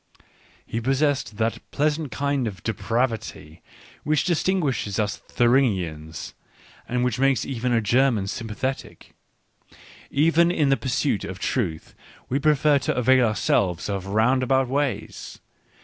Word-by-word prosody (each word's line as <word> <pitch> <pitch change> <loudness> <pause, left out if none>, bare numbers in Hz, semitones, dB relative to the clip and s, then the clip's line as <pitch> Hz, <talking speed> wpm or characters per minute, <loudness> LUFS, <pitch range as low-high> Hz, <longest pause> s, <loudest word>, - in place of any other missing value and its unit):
He 115 - -4
possessed 135 -3 0
that 115 0 -1
pleasant 150 0 -1
kind 140 -3 -1
of 95 -6 -7
depravity 110 -7 -3 0.4
which 150 0 +1
distinguishes 160 - 0
us 105 -1 -1
Thuringians, 95 - 0 0.6
and 125 +1 0
which 125 -1 -1
makes 135 -1 +2
even 125 -2 -2
a 115 -1 +3
German 120 -1 +2
sympathetic 115 +6 -5 0.5
— - - -23 0.2
even 165 +4 +3
in 155 -5 +1
the 135 - +4
pursuit 130 -5 -1
of 95 - -6
truth 95 -9 -2 0.4
we 135 - 0
pre 150 +1 +3
fer 145 0 +3
to - - -2
avail 125 0 +4
ourselves 95 -3 0
of 95 -1 -3
roundabout 130 +5 +2
ways. 140 0 -3
125 Hz, 130 wpm, -24 LUFS, 105-140 Hz, 0.6 s, the